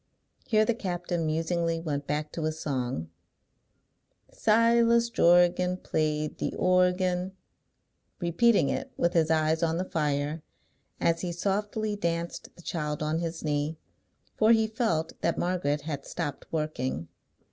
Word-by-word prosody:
Here 215 -1 +4
the 235 - +2
captain 175 -5 -2
musingly 165 +1 0
went 145 -4 -3
back 150 +1 -2
to 160 - -3
his 155 0 -2
song, 125 - -3 1.2
Silas 235 +1 +4
Jorgan 175 0 +4
Played 155 -3 -1
the - - -2
organ; 180 0 +2 0.9
repeating 175 -1 +3
it - - -3
with 170 +1 +1
his 160 -3 +3
eyes 160 0 +2
on 165 0 +1
the 185 - -1
fire, 150 -1 -1 0.6
as 165 0 +1
he 180 - -2
softly 205 +4 -1
danced 170 -3 -3
the 175 - -15
child 150 -4 -3
on 155 +2 0
his 165 -1 -4
knee. 150 +1 -1 0.6
For 220 +1 +4
he 220 -1 +3
felt 215 -8 -1
that 165 -1 0
Margaret 170 -5 0
had 145 -2 -5
stopped 150 -4 -4
working. 130 - -2
170 Hz, 135 wpm, -28 LUFS, 155-185 Hz, 1.2 s, Here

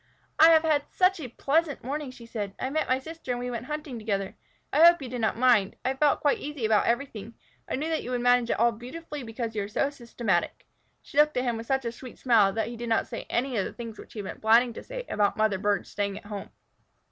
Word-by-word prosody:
"I 320 - +9
have 320 -1 +6
had 300 -3 +2
such 370 0 +2
a 285 - -5
pleasant 285 +5 0
morning," 285 +2 -3
she 245 -2 -12
said. 205 -4 -5
"I 260 - -2
met 310 +2 -1
my 255 - +3
sister 320 +1 -10
and 245 - -4
we 245 0 -3
went 240 +1 -5
hunting 300 -5 -5
together. 200 -3 -2 0.4
I 300 +4 +5
hope 345 0 +8
you 270 - -6
did 245 -1 -4
not 220 - 0
mind. 230 -5 +3
I 260 - +2
felt 285 +2 +2
quite 290 - +2
easy 290 -5 -4
about 215 -1 +3
everything. 235 -3 -2 0.3
I - - 0
knew 295 +4 -2
that 320 - 0
you - - -7
would 250 -1 -1
manage 245 -1 +3
it - - +1
all 235 +2 +4
beautifully, 290 +6 -8
because 230 -1 -5
you 210 - 0
are 200 - -3
so 275 +7 0
systematic." 235 -3 -2 0.4
She 285 - -2
looked 300 -2 +4
at 250 - +1
him 240 -2 0
with 225 0 -7
such 265 -2 0
a 235 - -1
sweet 250 +1 -11
smile 220 -6 +4
that 220 -1 -1
he 235 - -7
did 235 0 -5
not 225 - +2
say 230 - -7
any 250 0 0
of 195 - +1
the - - -6
things 230 -3 -8
which - - -12
he 220 - -7
had - - -8
been - - -7
planning 230 +2 +4
to - - -8
say - - -7
about 205 0 +1
mother 215 -3 +2
birds 205 0 0
staying 200 -1 -2
at - - -12
home. 205 -1 -7
245 Hz, 265 wpm, -27 LUFS, 225-285 Hz, 0.4 s, I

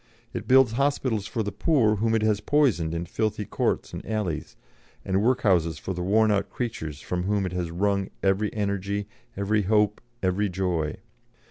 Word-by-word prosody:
It - - -5
builds 130 -2 +6
hospitals 130 -5 0
for 115 - -2
the 100 - -3
poor 115 -10 +2
whom 115 +2 +1
it 110 - +1
has 105 -1 +2
poisoned 110 - +2
in 85 +1 -2
filthy 105 +3 -2
courts - - -1
and - - -6
alleys, 100 -9 -3 0.5
and 95 +1 +1
workhouses 95 -10 +2
for 95 - -4
the 90 - -4
worn 110 +4 +3
out 100 -1 0
creatures 80 - -4
from 90 0 -3
whom 100 0 +1
it 90 - -3
has 90 -2 -2
wrung 100 +3 0
every 100 +2 +2
energy, 100 -1 -2 0.3
every 105 +2 +1
hope, 105 +1 +2 0.2
every 95 +2 +1
joy. 90 -4 -1
100 Hz, 170 wpm, -26 LUFS, 90-110 Hz, 0.5 s, builds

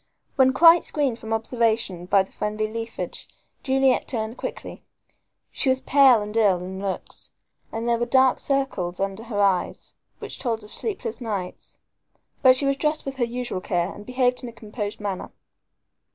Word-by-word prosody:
When 260 -1 +5
quite 335 +5 +7
screened 275 -7 0
from 220 - -8
observation 225 -5 0
by 195 0 +4
the 190 - -18
friendly 215 +1 -2
leafage, 225 +1 -6 0.3
Juliet 265 -1 +2
turned 225 -2 -3
quickly. - - -7 0.7
She 270 - 0
was 260 0 +3
pale 265 -6 +5
and 210 +1 -7
ill 195 -6 +3
in 190 +1 -6
looks, 195 -1 -5 0.4
and 225 +1 -4
there 235 -1 +2
were 240 - -1
dark 260 0 +4
circles 265 -11 -1
under 195 +2 -2
her 220 -4 -3
eyes 195 -3 0 0.2
which - - -7
told 230 -4 -2
of 210 - -13
sleepless 435 - -4
nights. 200 -6 -5 0.6
But 255 -2 +7
she 275 - -1
was 275 0 +1
dressed 305 +1 0
with 270 -1 -5
her 245 - +2
usual 240 -5 -4
care 175 0 -1
and 205 - -11
behaved 250 +1 0
in 245 - -6
a - - -13
composed 210 -2 -6
manner. 200 -3 -4
230 Hz, 170 wpm, -24 LUFS, 205-260 Hz, 0.7 s, quite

